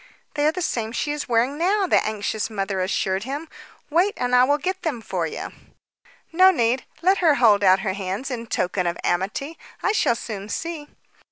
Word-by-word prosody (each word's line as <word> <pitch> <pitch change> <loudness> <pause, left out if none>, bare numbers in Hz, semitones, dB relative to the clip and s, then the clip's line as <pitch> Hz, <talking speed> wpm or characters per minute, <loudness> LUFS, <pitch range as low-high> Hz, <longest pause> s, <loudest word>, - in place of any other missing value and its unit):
"They 295 0 +1
are - - +4
the 360 +2 -4
same 225 -6 -2
she 290 - -1
is 295 -3 -4
wearing 245 +5 +1
now," 390 +4 +2
the - - +3
anxious 215 +1 -2
mother 195 -3 -2
assured 190 +1 -1
him. 285 +6 -5 0.4
"Wait, 360 +6 +2
and 250 0 -1
I 250 - +6
will 285 +2 +2
get 375 +5 -3
them 300 -9 -2
for 180 -6 -3
you." - - -6 0.8
"No 370 +3 +6
need. 250 -6 +1 0.2
Let 380 +2 +4
her 320 -5 +4
hold 210 -6 +4
out 190 0 +5
her 190 - -1
hands 200 +7 -4
in 235 -2 -5
token 180 -3 -1
of 170 - -2
amity. 205 - -2 0.2
I - - +3
shall 320 - +2
soon 210 -3 -6
see." 325 0 -4
245 Hz, 195 wpm, -23 LUFS, 200-320 Hz, 0.8 s, I